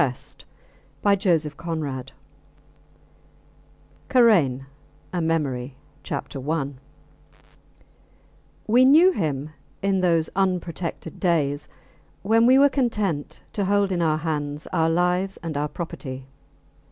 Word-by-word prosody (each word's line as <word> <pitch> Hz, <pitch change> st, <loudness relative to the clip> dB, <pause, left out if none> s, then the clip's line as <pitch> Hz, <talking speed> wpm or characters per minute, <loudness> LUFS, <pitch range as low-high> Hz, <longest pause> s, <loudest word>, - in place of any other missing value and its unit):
C. -, -, -10 dB, 0.7 s
TALES 185 Hz, -5 st, +3 dB
OF 150 Hz, 0 st, -7 dB
UNREST 145 Hz, -6 st, -4 dB, 2.0 s
KARAIN, 175 Hz, -, +4 dB, 0.5 s
A 175 Hz, -, -1 dB
MEMORY 140 Hz, -6 st, -1 dB, 0.3 s
I 145 Hz, +2 st, -2 dB, 2.0 s
We 240 Hz, +4 st, +5 dB
knew 315 Hz, +8 st, +7 dB
him 150 Hz, -, -2 dB, 0.3 s
in 195 Hz, -1 st, +1 dB
those 165 Hz, -3 st, +2 dB
unprotected 180 Hz, -3 st, -2 dB
days 150 Hz, -5 st, 0 dB, 0.6 s
when 225 Hz, +3 st, +4 dB
we 260 Hz, +1 st, +6 dB
were 280 Hz, +1 st, +7 dB
content 210 Hz, -, -2 dB
to 200 Hz, -, -1 dB
hold 200 Hz, 0 st, +2 dB
in 175 Hz, -2 st, 0 dB
our 155 Hz, -2 st, +2 dB
hands 150 Hz, -2 st, -3 dB
our 160 Hz, 0 st, +2 dB
lives 180 Hz, +3 st, +1 dB
and 165 Hz, -3 st, -4 dB
our 145 Hz, +1 st, 0 dB
property. 135 Hz, -5 st, -7 dB
165 Hz, 105 wpm, -24 LUFS, 150-195 Hz, 2.0 s, knew